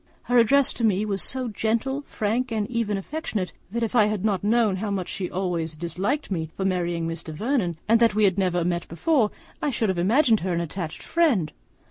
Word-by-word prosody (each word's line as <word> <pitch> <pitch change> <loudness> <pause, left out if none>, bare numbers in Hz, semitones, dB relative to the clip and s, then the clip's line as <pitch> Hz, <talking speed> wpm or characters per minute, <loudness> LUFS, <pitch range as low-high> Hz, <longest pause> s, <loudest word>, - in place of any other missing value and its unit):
Her 245 0 +3
address 275 +4 +4
to 235 - -5
me 210 -1 +2
was 200 -2 -2
so 260 -1 0
gentle, 230 +6 -1
frank, 230 +4 -1
and 215 -2 -1
even 225 -4 0
affectionate, 205 -4 -4 0.2
that, 235 +4 -2
if 225 - -2
I 215 -3 +6
had 210 -1 -2
not 200 -4 0
known 215 -2 +2
how 210 +2 -3
much 195 -3 -2
she 190 - -3
has - - -7
always 175 -4 -2
disliked 185 - -2
me 160 -4 -2
for 190 - -1
marrying 175 -3 0
Mr. 165 -1 -5
Vernon, 200 - -1
and 230 +1 +5
that 230 -3 +4
we 215 - +3
had 190 -3 +4
never 175 -3 +1
met 175 0 -1
before, 235 - +1 0.3
I 295 - +1
should 225 -5 0
have 185 -2 0
imagined 225 - +4
her 180 0 -2
an 170 - 0
attached 170 -1 -5
friend. 275 - +1
205 Hz, 215 wpm, -25 LUFS, 180-235 Hz, 0.3 s, I